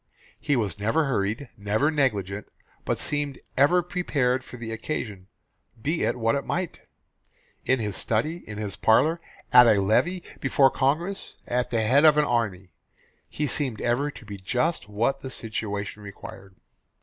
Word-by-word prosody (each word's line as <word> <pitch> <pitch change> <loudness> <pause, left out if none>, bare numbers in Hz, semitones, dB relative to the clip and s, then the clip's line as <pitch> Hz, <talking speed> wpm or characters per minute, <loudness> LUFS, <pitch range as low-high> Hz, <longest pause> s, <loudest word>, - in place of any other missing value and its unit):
He 145 - +1
was 105 -6 -1
never 130 +10 +1
hurried; 115 +1 -1
never 105 +9 +1
negligent; 105 - -1 0.4
but - - 0
seemed 145 -2 -2 0.2
ever 170 +6 +4
prepared 140 -8 0
for 125 - -10
the 115 -1 -6
occasion, 110 -5 -5 0.5
be 155 +9 -1
it - - +1
what 115 -1 +1
it 140 - -1
might. 180 -1 -3 0.9
In 130 - +3
his 105 -3 -3
study, 150 +10 0
in 105 - -6
his 105 -2 -4
parlour, 155 +9 +3 0.3
at 125 -1 +9
a 110 -3 +5
levee, 170 - +1 0.2
before 135 0 +4
Congress, 165 +9 -1
at 125 0 -1
the 115 -2 0
head 135 +7 +4
of 155 -2 +7
the 150 0 +3
army, 100 - -1 0.6
he 150 - -2
seemed 130 -5 -1
ever 125 +5 +1
to 130 - -11
be 100 -1 -7
just 125 - -1
what 120 +7 0
the 130 - -6
situation 105 -3 -4
required. 100 -1 -11
125 Hz, 160 wpm, -26 LUFS, 105-145 Hz, 0.9 s, at